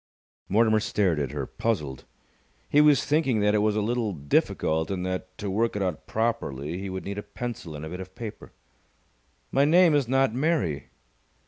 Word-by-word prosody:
Mortimer 110 +1 +4
stared 95 -6 +1
at 70 -3 -1
her, 70 -1 -4
puzzled. 75 - -3 0.6
He 145 - +5
was 150 -2 +5
thinking 145 -7 +2
that 105 0 +3
it 105 - +3
was 105 0 +2
a 105 - +1
little 115 -2 -1
difficult 80 +1 0
and 90 -2 -2
that, 95 0 -4
to 105 - -5
work 115 +3 0
it 100 - 0
out 90 -4 -3
properly, 85 - -2
he 100 0 -5
would 95 0 -5
need 100 +1 -4
a - - -4
pencil 105 -5 -6
and 75 +1 -6
a - - -6
bit 90 +2 -6
of 95 0 -9
paper. 110 -3 -8 1.0
"My 135 - +3
name 170 +2 +5
is 145 -4 +2
not 135 -2 +2
Mary!" 130 - 0
105 Hz, 190 wpm, -26 LUFS, 90-120 Hz, 1.0 s, He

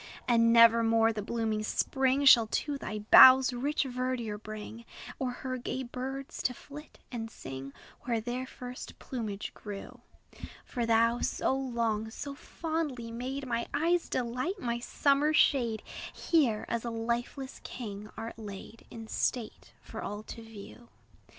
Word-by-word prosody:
And 230 -1 +4
never 230 0 +7
more 225 0 +3
the 215 - -3
blooming 220 0 -1
spring 265 +5 +1
Shall 235 -4 +8
to 290 +6 -1
thy 215 -6 -5
boughs 260 0 +10
rich 280 +6 0
verdure 250 -4 -3
bring, 215 +2 -8 0.4
Or 260 - -1
her 255 +1 -4
gay 260 +2 -3
birds, 260 +2 -5
to 250 - -1
flit 295 +4 -12
and 225 -2 -4
sing 135 -6 -8 0.3
Where 235 -2 -1
their 245 +3 -4
first 250 -1 -9
plumage 215 -6 -5
grew; 205 -2 -8 0.7
For 240 -2 -3
thou, 230 +1 +3
so - - 0
long, 235 -5 -1
so 280 +5 -6
fondly 295 -6 -4
made 260 +4 -4
My 235 -2 -2
eye's 335 +3 +1
delight, 255 - -2
my 235 -6 -2
summer 285 +4 +2
shade, 235 -8 +3 0.3
Here, 260 -11 +1
as 235 -1 -2
a 240 - -3
lifeless 235 +4 -3
king, 210 -3 -7
art 230 0 -6
laid 210 +1 -9
In 225 -1 -8
state, 225 +1 -2
for - - -7
all 205 +1 -5
to 230 - -9
view. 225 +2 -12
235 Hz, 145 wpm, -30 LUFS, 225-265 Hz, 0.7 s, boughs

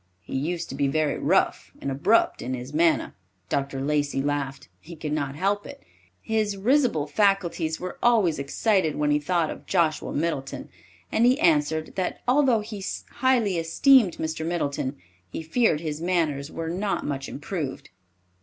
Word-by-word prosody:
He - - -7
used 165 +5 -2
to - - -6
be 140 +1 0
very 150 +1 0
rough - - +1
and 140 - -3
abrupt 150 +12 +2
in 130 +1 -3
his 125 +3 -8
manner." 165 +1 +2 0.4
Dr. 140 -1 -1
Lacey 145 0 0
laughed. 140 -1 -2
He 170 +1 -11
could 155 -1 -5
not 140 -2 -2
help 200 +5 0
it. - - -11 0.4
His 215 -2 -1
risible 235 - +2
faculties 170 -2 +1
were 185 - -6
always 215 -11 +3
excited 160 +4 +1
when 150 0 +1
he 145 - +3
thought 165 +1 0
of - - -10
Joshua 170 -4 +1
Middleton, 145 -4 -3 0.4
and 235 +2 +4
he 255 +2 +3
answered, 155 -1 +2
that 185 - -2
although 255 -3 +4
he 210 -2 -7 0.3
highly 235 -8 +2
esteemed 200 +5 +4
Mr. 160 0 -3
Middleton, 145 -5 -2 0.3
he 160 - -6
feared 160 -2 +2
his 155 -1 -4
manners 155 -5 0
were 165 0 -4
not 195 +3 -2
much 135 -2 -3
improved. 145 - -5
160 Hz, 160 wpm, -25 LUFS, 145-195 Hz, 0.4 s, and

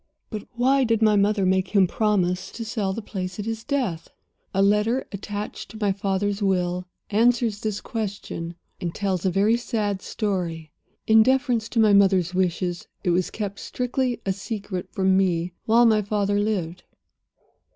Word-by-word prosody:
"But 215 -3 -6
why 265 +3 +3
did 225 -2 +2
my 215 -1 +5
mother 200 -1 +2
make 185 0 +2
him 195 -2 +6
promise 185 -2 0
to 230 - -5
sell 210 -3 -1
the 220 +3 -5
place 185 -3 -5
at 210 - -4
his 225 0 -4
death? 245 - -2 0.4
"A 195 - +2
letter, 210 +5 +2
attached 205 +1 -6
to 220 - -10
my 205 -2 +2
father's 200 +1 -1
will, 180 -2 0 0.2
answers 230 0 +2
this 210 -2 -2
question, 200 -6 -5 0.2
and 170 -3 -4
tells 190 -2 -1
a - - +4
very 205 +5 +3
sad 210 -5 -2
story. 175 -7 -3 0.3
In 220 0 +6
deference 245 -2 +2
to 235 - -1
my 215 -2 +5
mother's 190 -3 +4
wishes 180 -1 -1 0.2
it 180 - +2
was 180 +1 +1
kept 205 -2 -5
strictly 250 0 -2
a 195 - +1
secret 200 -2 -5
from 190 0 +2
me 180 -2 +1
while 235 +2 +5
my 220 -2 +4
father 205 0 0
lived. 185 -5 -2
205 Hz, 165 wpm, -24 LUFS, 185-220 Hz, 0.4 s, him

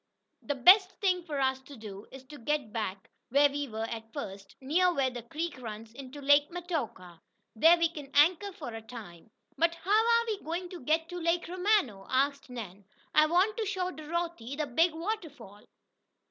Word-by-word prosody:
"The 285 - -2
best 370 - +7
thing 365 -3 +2
for 295 -4 -3
us 265 -1 +1
to 270 0 -13
do 205 -2 -9
is 265 -1 -11
to 295 +3 -12
go 295 +6 +1
back 210 -7 -5 0.2
where 285 +3 +5
we 285 0 -3
were 220 -2 -4
at 225 -1 -7
first, 195 -7 -7
near 345 +7 +2
where 270 -6 +1
the 245 -1 -6
creek 300 +4 -5
runs 220 -1 -8
into 270 +2 -9
Lake 285 +1 +5
Metoka. 280 - -5 0.3
There 330 +10 +6
we 335 0 +3
can 295 -4 -9
anchor 350 +7 +4
for 355 - -8
a 225 - -6
time." 220 -6 -11 0.3
"But 335 +1 +3
how 340 +4 -6
are 465 +2 +4
we 430 -3 -2
going 345 +3 -4
to 360 - -8
get 315 +5 +1
to 355 0 -5
Lake 340 +1 0
Romano?" 360 - +1
asked 280 +1 0
Nan. 205 -6 -8 0.3
"I 305 0 +6
want 370 +7 +2
to 445 - -1
show 370 -2 -1
Dorothy 315 -5 -4
the 305 +1 -1
big 325 +6 +3
waterfall." 320 - -6
290 Hz, 190 wpm, -30 LUFS, 235-345 Hz, 0.3 s, best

